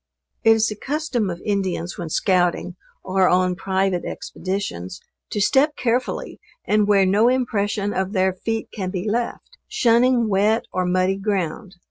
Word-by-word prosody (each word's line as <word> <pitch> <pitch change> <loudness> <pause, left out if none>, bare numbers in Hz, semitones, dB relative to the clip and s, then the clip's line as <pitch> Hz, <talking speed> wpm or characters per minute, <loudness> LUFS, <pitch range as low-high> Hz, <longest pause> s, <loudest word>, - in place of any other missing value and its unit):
It 225 -1 +7
is 225 0 +2
the 210 - -5
custom 265 -4 -2
of 170 -1 -5
Indians 190 -4 -1
when 170 -2 -6
scouting, 180 -1 +1 0.3
or 190 0 +2
on 180 0 +3
private 190 -1 0
expeditions, 185 - -5 0.3
to - - -3
step 270 +9 +3
carefully 245 0 -2 0.3
and 210 -1 +2
where 200 -2 +4
no 205 +5 +4
impression 205 -5 0
of 190 +1 -1
their 190 -2 +1
feet 225 +4 -3
can 190 -4 -3
be 185 +2 -4
left 240 - -3
shunning 240 0 +3
wet 210 +3 +2
or 185 0 0
muddy 185 +1 +1
ground. 195 -1 -3
200 Hz, 150 wpm, -22 LUFS, 185-225 Hz, 0.3 s, It